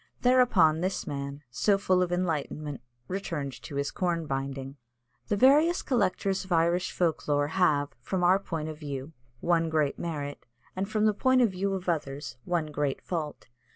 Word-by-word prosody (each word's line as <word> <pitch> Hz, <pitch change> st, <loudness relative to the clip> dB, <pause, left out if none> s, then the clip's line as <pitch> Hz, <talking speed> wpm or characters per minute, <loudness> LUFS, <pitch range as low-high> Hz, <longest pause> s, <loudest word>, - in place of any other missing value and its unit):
Thereupon 230 Hz, -11 st, +4 dB
this 185 Hz, +2 st, -1 dB
man, 140 Hz, 0 st, -5 dB
so 195 Hz, -, +2 dB
full 185 Hz, -2 st, +2 dB
of 180 Hz, -1 st, 0 dB
enlightenment, 155 Hz, -6 st, -2 dB, 0.3 s
returned 160 Hz, -7 st, -3 dB
to 145 Hz, -, -8 dB
his 140 Hz, 0 st, -1 dB
corn 170 Hz, -3 st, -1 dB
binding. 135 Hz, -1 st, -4 dB, 0.5 s
The 205 Hz, -, +1 dB
various 295 Hz, -, +5 dB
collectors 200 Hz, -6 st, 0 dB
of 185 Hz, -, -14 dB
Irish 170 Hz, +2 st, +2 dB
folk 165 Hz, -4 st, 0 dB
lore 145 Hz, 0 st, +2 dB
have, 155 Hz, -5 st, +2 dB
from 180 Hz, +8 st, -2 dB
our 185 Hz, +2 st, +5 dB
point 165 Hz, -5 st, -4 dB
of 155 Hz, -1 st, -7 dB
view, 140 Hz, 0 st, -6 dB, 0.3 s
one 165 Hz, -1 st, +2 dB
great 155 Hz, -3 st, 0 dB
merit, 145 Hz, -5 st, -5 dB, 0.3 s
and 195 Hz, +2 st, -2 dB
from 215 Hz, 0 st, +1 dB
the 215 Hz, -, +4 dB
point 260 Hz, +4 st, +3 dB
of 225 Hz, -, +3 dB
view 195 Hz, +1 st, -1 dB
of 185 Hz, -1 st, -6 dB
others, 140 Hz, -7 st, -2 dB
one 165 Hz, -4 st, -1 dB
great 145 Hz, -2 st, -1 dB
fault. 155 Hz, -4 st, -4 dB
165 Hz, 170 wpm, -28 LUFS, 145-190 Hz, 0.5 s, various